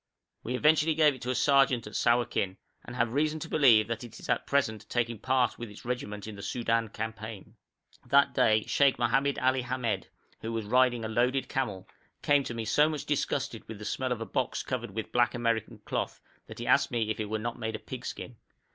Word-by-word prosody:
We 125 - -3
eventually 155 +3 +3
gave 155 -2 +5
it 130 - -12
to 125 - -4
a 130 - 0
sergeant 135 -2 +3
at 105 - -9
Sawakin, 120 -5 +1 0.3
and 120 - -9
have 120 -2 0
reason 155 +2 +1
to 165 - -5
believe 120 -10 +5
that 115 0 -4
it 120 -2 -10
is - - -11
at - - 0
present 120 -7 0
taking 120 -2 -1
part 130 -1 +1
with 120 -2 -6
its 105 - -13
regiment 105 -4 -4
in 110 -1 -7
the 100 - -9
Soudan 115 +1 0
campaign. 110 -1 -7 0.5
That 140 +2 +4
day, 110 -5 +3
Sheikh 140 -2 +3
Mohamed 135 +4 +1
Ali 130 0 +2
Hamed, 120 -6 -2 0.3
who 115 - -5
was 115 -2 -2
riding 120 0 +3
a - - -1
loaded 125 +4 +1
camel, 105 -9 -3 0.4
came 145 -1 +4
to 120 - -5
me 115 -1 -3
so 150 +7 +4
much 155 -3 -4
disgusted 135 -5 -2
with 110 - -7
the 105 - -9
smell 130 +3 -2
of 120 -2 -2
a - - -2
box 125 +2 -2
covered 120 -3 -3
with 110 +2 -5
black 120 0 +2
American 115 -2 -1
cloth, - - -3 0.3
that 110 - -10
he 120 - -5
asked 140 +3 +4
me 115 -3 -1
if 110 - -4
it 105 -1 -3
were 110 - -1
not 115 +2 -4
made 110 0 -3
of - - -9
pig - - -7
skin. - - -7
120 Hz, 220 wpm, -29 LUFS, 110-130 Hz, 0.5 s, gave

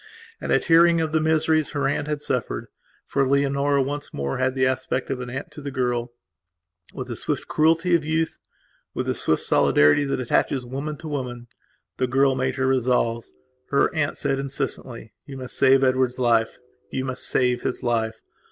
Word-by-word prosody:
And, - - -3
at - - +3
hearing 170 0 +5
of 160 -1 -1
the 160 - +2
miseries 155 -1 +2
her 145 -2 0
aunt 145 +1 -1
had 150 -1 -2
sufferedfor 125 +2 -3
Leonora 140 0 +2
once 145 +2 -4
more 70 - -3
had 130 0 0
the 130 -1 +2
aspect 130 0 -1
of 130 - -2
an 125 -1 -6
aunt 130 +3 -6
to 150 - -10
the 140 - -5
girlwith 125 -2 -1 1.0
the - - -6
swift - - -3
cruelty 165 +3 +2
of 170 -2 +3
youth 160 +1 -1
and, - - -54 0.5
with - - -2
the - - 0
swift 80 - 0
solidarity 75 - +4
that 135 - -1
attaches 130 +1 0
woman 140 +4 -5
to 160 - -9
woman, 125 -5 -5 0.5
the 130 - +1
girl 135 +2 +3
made 130 0 -1
her 130 -1 0
resolves. 125 -3 +1 0.4
Her 140 - +2
aunt 155 -3 -1
said 135 - 0
incessantly: 135 -4 -4
"You 135 -1 -8
must 130 -1 -7
save 135 +1 +5
Edward's 130 -1 +2
life; 115 -3 +2 0.3
you 130 - -3
must 130 -1 -4
save 125 -1 +1
his - - -3
life. 110 -2 -1
135 Hz, 180 wpm, -23 LUFS, 125-145 Hz, 1.0 s, hearing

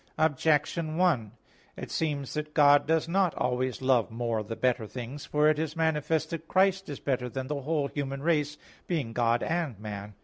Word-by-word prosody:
Objection 155 +1 +1
1: 145 - +2 0.5
It - - -7
seems 145 -4 -2
that 150 0 -4
God 145 -1 +6
does 160 0 +2
not 185 0 +1
always 125 -1 -1
love 130 -4 +3
more 115 -1 -2
the 105 +2 -5
better 120 -3 0
things. 125 +5 -7
For 150 +1 +3
it 155 -1 +3
is 160 0 -2
manifest 160 -1 0
that 165 -1 -5
Christ 190 -1 +2
is 145 - -5
better 125 -3 -1
than 130 +2 -4
the 145 +1 -3
whole 150 0 0
human 140 -1 -4
race, 150 -2 +1 0.3
being 145 -10 -2
God 120 0 +2
and 160 - -1
man. 105 -1 -7
145 Hz, 180 wpm, -28 LUFS, 125-160 Hz, 0.5 s, God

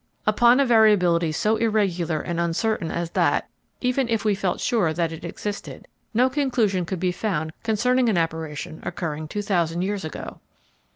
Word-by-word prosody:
Upon 240 +4 +5
a 280 - +4
variability 190 -8 +4
so 215 +8 +1
irregular 185 -8 0
and 170 -1 -3
uncertain 170 +2 0
as 170 0 -3
that, - - +1 0.3
even 250 0 0
if 225 -2 0
we 210 - +3
felt 190 -2 -1
sure 195 -10 +1
that 165 0 -1
it 160 - -8
existed, 205 -1 -6 0.2
no 245 +3 +3
conclusion 245 - 0
could 185 -1 -3
be 180 0 +1
found 170 -5 -2
concerning 240 +3 +2
an 205 - +1
apparition 160 -2 -3
occurring 160 -3 -4
2000 175 -3 -1
years 200 -1 -2
ago. 155 - -7
190 Hz, 160 wpm, -24 LUFS, 170-225 Hz, 0.3 s, Upon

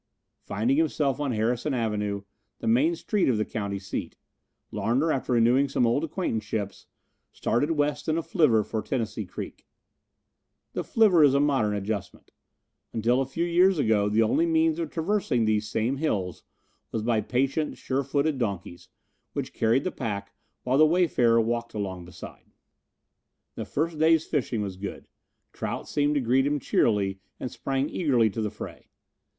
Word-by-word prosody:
Finding 115 +7 +1
himself 150 -4 +1
on 145 -3 -1
Harrison 120 +5 0
Avenue, 105 -3 -1 0.3
the - - -8
main 275 +9 +3
street 210 - 0
of 120 - +2
the 105 - 0
county 100 -3 -3
seat, 95 0 -5 0.5
Larner, 135 +8 +1
after 130 -2 -1
renewing 125 +4 +4
some 125 - +2
old 120 +6 +1
acquaintanceships, 110 - -3 0.4
started 140 +6 0
west 145 0 -1
in 155 - +1
a 165 - -1
flivver 140 - +3
for 110 +1 -3
Tennessee 110 -3 -3
Creek. - - -8 1.1
The - - -2
flivver 200 -8 +4
is 140 -2 +5
a - - +4
modern 135 -8 +2
adjustment. 100 -1 -5 0.6
Until 120 +4 +2
a 135 - -2
few 165 +5 -2
years 180 +2 +4
ago 110 -6 +2
the 110 +2 +3
only 160 +10 +2
means 160 0 +2
of 165 -2 -2
traversing 165 - 0
these 105 -1 0
same 120 +5 0
hills 100 - -2 0.5
was 110 - -2
by 115 -1 +2
patient, 135 +7 -1
sure 135 +1 -1
footed 140 +1 0
donkeys, 100 -6 -4 0.4
which - - -4
carried 115 +4 +2
the 185 - -2
pack 100 -4 -4 0.3
while 130 +3 +1
the - - +8
wayfarer 150 -9 +3
walked 115 +1 -1
along 95 -4 -4
beside. 85 - -12 1.0
The - - -5
first 160 +1 -2
day's 160 0 +4
fishing 125 -7 -1
was 95 -2 -5
good. 100 +1 -7 0.5
Trout - - -4
seemed 145 0 +1
to 145 - +2
greet 130 +3 +2
him 145 0 0
cheerily 100 -6 +1 0.2
and 130 - -4
sprang 135 +1 -1
eagerly 125 - +2
to 110 - -3
the 105 - -1
fray. - - -10
125 Hz, 160 wpm, -26 LUFS, 110-150 Hz, 1.1 s, the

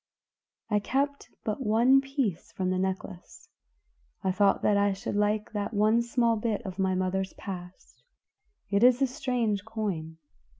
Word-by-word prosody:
"I 210 - +3
kept 280 +5 -1
but 220 +5 -2
one 240 +5 +5
piece 270 - -2
from 185 -1 -1
the 185 - 0
necklace; 190 -1 -5 0.7
I 190 - +2
thought 195 +1 +2
that 210 - +3
I 200 0 +3
should 195 - -5
like 210 +1 0
that 210 0 -3
one 215 +3 +4
small 235 -1 +1
bit 215 -1 -2
of 190 0 -6
my 190 -1 +1
mother's 185 +1 -1
past. 180 -2 -9 0.7
It 200 +2 +3
is 250 0 +6
a - - +6
strange 250 -7 -1
coin." 200 -8 -4
210 Hz, 155 wpm, -28 LUFS, 190-235 Hz, 0.7 s, is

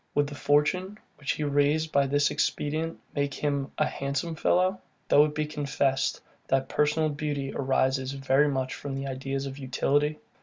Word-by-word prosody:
Would 145 - +3
the 145 - -7
fortune, 150 +8 +1 0.2
which 140 - -1
he 155 - -3
raised 145 +2 +2
by 140 -1 +3
this 145 +1 +2
expedient, 160 +3 -1 0.2
make 140 -1 -1
him 140 -2 -1
a - - +3
handsome 140 +5 -2
fellow; 185 +4 +2 0.3
though 145 - +7
it 150 -1 -4
be 155 - 0
confessed, 140 -2 0 0.3
that 135 0 +1
personal 150 +1 +2
beauty 145 -2 -3
arises 130 0 +1
very 135 +1 +3
much 130 -2 -1
from 135 -1 -5
ideas 135 +1 -3
of 135 +1 -6
utility? 145 +3 +1
145 Hz, 160 wpm, -27 LUFS, 135-150 Hz, 0.3 s, though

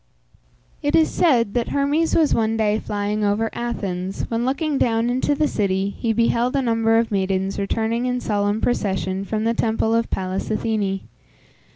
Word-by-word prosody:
It 290 -1 +1
is 320 -1 +4
said 240 - +2
that 240 -1 0
Hermes 290 +4 +1
was 315 -3 +3
one 225 0 +1
day 215 -1 +1
flying 210 0 -2
over 210 +2 +1
Athens, 195 -6 -3
when, 230 +1 -1
looking 280 +2 0
down 230 0 +1
into 260 +3 +1
the 305 +1 +1
city, 195 -3 0
he 225 +2 -2
beheld 235 +3 +1
a 275 - +2
number 225 -1 +2
of 230 -1 +1
maidens 190 -1 -1
returning 225 +4 -1
in 250 0 -1
solemn 205 -1 0
procession 190 -4 -1
from 215 +1 -2
the 230 +1 +1
temple 225 -1 0
of 230 0 +1
Pallas 185 0 -3
Athene. 215 -3 -1
225 Hz, 170 wpm, -22 LUFS, 205-240 Hz, -, is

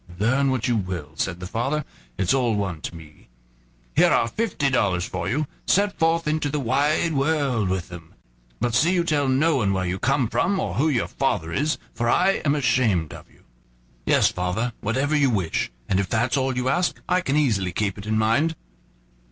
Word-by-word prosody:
"Learn 130 +7 +2
what 130 -3 0
you 120 - +2
will," 90 -7 -4
said 85 +2 -3
the 90 - -6
father, 135 +10 -2 0.3
"it's 95 - +1
all 125 -5 +1
one 95 -6 -3
to - - -6
me. 75 -5 -14 0.7
Here - - +5
are - - +3
fifty 155 - -1
dollars 95 -7 +1
for 95 0 -4
you, 150 +7 0 0.2
set 200 +1 +2
forth 165 0 +2
into 155 -1 0
the 150 +1 -2
wide 145 +6 +1
world 135 -7 +1
with 95 -3 -2
them; 85 -2 -11 0.4
but 120 - -1
see 165 +9 +3
you 175 - +2
tell 150 -4 +1
no 140 +4 +2
one 100 -6 +1
where 95 -1 -1
you 90 +1 -2
come 135 +2 +1
from 180 - 0
or - - -2
who 155 +5 +2
your 125 -6 0
father 80 +1 -1
is, 150 +3 0 0.2
for 120 0 -1
I 190 +8 +3
am 145 -1 +2
ashamed 115 - +1
of - - -12
you." - - -25 0.6
"Yes, - - +4
father, 90 +7 -2
whatever 130 +8 0
you 140 -3 +3
wish; 95 - -1 0.2
and 95 - +1
if 95 -2 -1
that's 120 +2 +1
all 130 -2 0
you 125 0 -1
ask, 175 +6 0
I 180 +1 +2
can 140 -4 -1
easily 105 -11 +1
keep 100 +2 -1
it 100 - -9
in 110 0 +1
mind." 140 +10 +2
125 Hz, 200 wpm, -23 LUFS, 95-150 Hz, 0.7 s, Here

